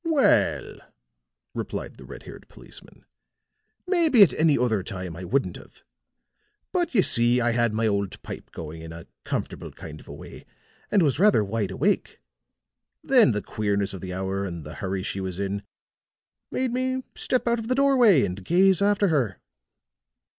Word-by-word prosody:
"Well," 320 -5 +2 0.8
replied - - -5
the - - -12
red - - -10
haired - - -12
policeman, - - -16 0.8
"maybe 335 - +5
at 185 - +3
any 155 -2 +3
other 115 -5 +1
time 90 -3 -6
I 90 - -8
wouldn't 135 +10 -1
have. - - -17 0.9
But 350 -7 -1
you 195 - +5
see, 120 +1 +3
I 120 0 +1
had 120 -1 +1
my 110 +1 0
old 100 -2 -1
pipe - - -8
going 80 0 -8
in 80 0 -9
a 85 - -10 0.2
comfortable - - -4
kind 75 -1 -10
of - - -17
a - - -9
way, - - -11 0.4
and 200 -4 +3
was 145 -1 +1
rather 205 - +5
wide 105 -1 -2
awake. 195 - -1 0.8
Then, 250 - +5
the 105 -1 -2
queerness 100 -2 -1
of 95 - -7
the 95 - -6
hour, 95 +1 -2
and 85 -4 -5
the 75 +1 -9
hurry 95 +1 -3
she 95 - -4
was 95 -2 -4
in, 100 0 -2 0.9
made 255 -2 -2
me 260 +1 -1
step 255 -1 -1
out 235 0 +2
of 225 - -6
the 255 - +1
doorway 255 - +5
and 90 +2 -6
gaze 185 - +3
after 205 -1 +3
her." 125 - 0
120 Hz, 170 wpm, -25 LUFS, -, 0.9 s, maybe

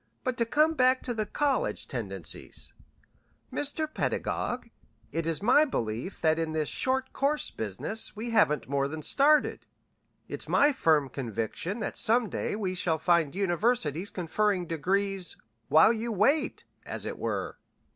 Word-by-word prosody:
But 255 -1 -1
to 230 - +1
come 305 +6 +3
back 255 -3 +3
to 245 - -2
the 215 -2 -2
college 285 +4 0
tendencies, - - -5 0.8
Mr. 290 +2 -1
Pedagog, 305 - -2 0.4
it 165 0 -2
is 165 +3 -1
my 255 +7 +6
belief 120 - -3
that 160 0 +3
in 160 -1 -2
this 155 -2 -1
short 260 0 -1
course 290 +2 0
business 110 - -2
we 230 +3 -4
haven't 205 -10 +3
more 140 0 0
than 155 +1 -6
started. 295 - +3 0.6
It's - - -6
my 290 +1 +5
firm 155 - +2
conviction 130 - -4
that - - -3
some 230 0 +3
day - - -2
we 195 -4 -2
shall 170 -3 0
find 170 -2 +2
universities 195 - 0
conferring 185 +2 0
degrees 190 +3 -1 0.3
'while 160 +9 +6
you 230 +1 -3
wait,' 270 +9 +1 0.2
as - - -4
it - - -5
were. - - -3
200 Hz, 145 wpm, -28 LUFS, 160-250 Hz, 0.8 s, my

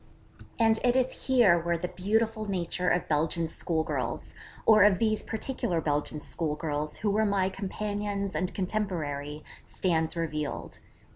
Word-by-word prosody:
And 225 -1 +4
it 245 0 +3
is 260 0 0
here 235 -10 +5
where 170 0 0
the 180 +1 -3
beautiful 220 +3 0
nature 180 -1 0
of 175 - +1
Belgian 160 +2 +1
schoolgirls, 160 0 -2 0.3
or 215 -1 +7
of 205 -2 +5
these 215 0 +1
particular 220 -6 -2
Belgian 150 0 -1
schoolgirls 150 -1 -2
who 210 0 0
were 215 +2 +2
my 200 -3 +2
companions 205 0 -3
and 185 -1 -1
contemporaries, 155 -8 -3 0.2
stands 160 -3 0
revealed. 155 -3 -3
185 Hz, 135 wpm, -28 LUFS, 160-215 Hz, 0.3 s, or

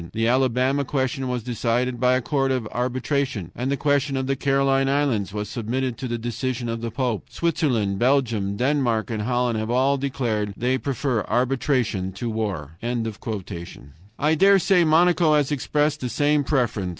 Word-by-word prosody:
The 115 +1 0
Alabama 130 +2 +2
question 135 -1 -2
was 125 -2 -2
decided 120 +1 -1
by 125 +1 +3
a 130 - -1
court 135 -1 0
of 125 -4 -1
arbitration, 130 - -2
and 125 +2 -2
the 140 - 0
question 145 -1 +1
of 130 - -1
the 135 +1 0
Caroline 135 0 +2
Islands 135 -9 0
was 105 +1 -4
submitted 125 +3 -2
to 130 - -3
the 120 -1 -2
decision 120 +1 -3
of 115 0 -3
the 115 - -3
Pope. 120 -2 -2
Switzerland, 125 - 0
Belgium, 120 -6 +1
Denmark, 125 -4 +1
and 110 -2 -2
Holland 120 0 0
have 110 +1 -3
all 130 +3 +2
declared 115 -7 -2
that - - -18
they 130 +2 +1
prefer 130 -4 -1
arbitration 120 -5 0
to 115 +5 -4
war." 95 -9 -4 1.4
I 150 +2 +2
dare 195 +5 +5
say 185 -1 +3
Monaco 165 0 +4
has 145 -1 +1
expressed 150 +1 0
the 125 - -2
same 145 +4 +2
preference. 120 -9 0
125 Hz, 170 wpm, -23 LUFS, 115-140 Hz, 1.4 s, dare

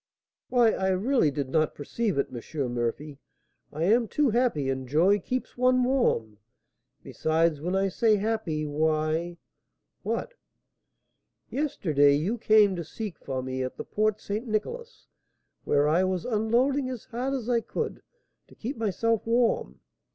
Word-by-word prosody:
"Why, 240 -3 +4
I 190 - -1
really 190 - +2
did 140 -1 -3
not 155 +2 +1
perceive 200 +6 -2
it, 140 - 0
M. 125 +1 -4
Murphy; 130 +5 -3 0.5
I 155 +2 -3
am 225 +6 +3
too 285 +2 +1
happy, 230 - +1
and 130 -1 -2
joy 175 +9 +3
keeps 255 +7 -4
one 255 0 +4
warm. 180 - 0 0.6
Besides, 160 -1 0
when 180 +4 -1
I 195 0 +2
say 220 +3 +3
happy, 205 -7 -1
why 155 +3 0 0.3
" - - -54
"What?" - - -3 1.2
"Yesterday 155 - +2
you 190 +11 -1
came 210 -3 +5
to 170 - -3
seek 205 +3 -7
for 130 -2 -4
me 130 0 -3
at 130 - -5
the - - -6
Port 215 0 0
St. 215 +5 -4
Nicolas, 470 - -4 0.6
where 145 0 +3
I 165 +5 +3
was 185 -2 -1
unloading 250 +4 +1
as 250 -4 -6
hard 255 +4 -3
as 245 -4 -4
I 240 -2 +2
could - - -4 0.5
to - - -18
keep 245 +4 -5
myself 225 +1 0
warm. 235 0 +1
195 Hz, 150 wpm, -27 LUFS, 155-235 Hz, 1.2 s, came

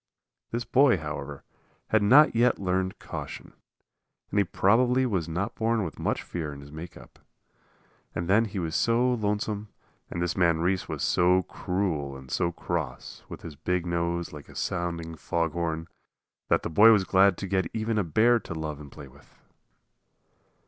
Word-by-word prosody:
This 120 +1 -3
boy, 135 -1 +4
however, 75 -2 -6 0.5
had 110 - +3
not 135 +7 +6
yet 120 +1 +3
learned 95 -1 -1
caution, - - -8 0.8
and 100 - +2
he - - +5
probably 125 +8 +3
was 95 -9 -1
not 100 +7 -2
born 115 -1 0
with 80 -5 -6
much - - -1
fear 80 -4 -5
in 70 -1 -9
his 70 +1 -13
make 80 +3 -9
up. - - -16 1.0
And 85 0 -2
then 105 +5 +4
he 105 -2 -6
was 80 -3 -2
so 120 +2 +2
lonesome, 105 -1 -2 0.4
and 85 - -5
this 85 0 -1
man 85 -3 +3
Reese 95 +2 0
was - - -3
so 90 +1 +3
cruel 80 -8 -2
and 65 -1 -12
so 85 - 0
cross, 80 -7 -5
with - - -9
his 80 -3 -8
big 90 +3 -1
nose 85 0 -2
like 75 -2 -10
a - - -14
sounding 85 -2 -3
fog 85 +1 -1
horn, 80 -1 -2 0.6
that - - +2
the - - -3
boy 110 +7 +8
was 105 -3 +4
glad 95 0 +4
to - - -4
get 95 -2 0
even 110 0 -1
a - - +2
bear 115 +9 +3
to 85 - -8
love 80 -2 -4
and 70 -2 -11
play 75 -3 -11
with. 65 - -21
90 Hz, 175 wpm, -27 LUFS, 80-105 Hz, 1.0 s, boy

